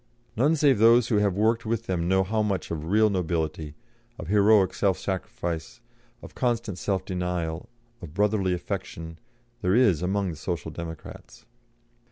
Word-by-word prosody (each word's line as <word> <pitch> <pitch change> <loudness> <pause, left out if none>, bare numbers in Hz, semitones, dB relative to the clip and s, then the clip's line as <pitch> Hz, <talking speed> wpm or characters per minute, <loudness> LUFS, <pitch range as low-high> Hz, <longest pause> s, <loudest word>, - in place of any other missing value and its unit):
None 145 +8 +3
save 145 -7 +3
those 115 +1 +5
who 110 - +2
have 100 -3 +1
worked 115 +2 +2
with 115 0 -2
them 85 -4 -1
know 95 +1 +3
how 110 +3 -1
much 100 -3 -2
of 80 -2 -4
real 105 +3 +3
nobility, 80 -4 -2 0.4
of 80 - -8
heroic 105 -2 +4
self 95 -3 +1
sacrifice, 85 -1 -4 0.4
of - - -11
constant 115 -6 -1
self 95 -2 -1
denial, 90 -3 -3 0.3
of 80 -2 -10
brotherly 100 -3 +1
affection, 80 -2 -6 0.4
there 95 +1 +2
is 105 -11 +4
among 95 +1 -1
the 80 - -9
Social 85 -1 -4
Democrats. 80 -2 -9
95 Hz, 155 wpm, -26 LUFS, 85-110 Hz, 0.4 s, those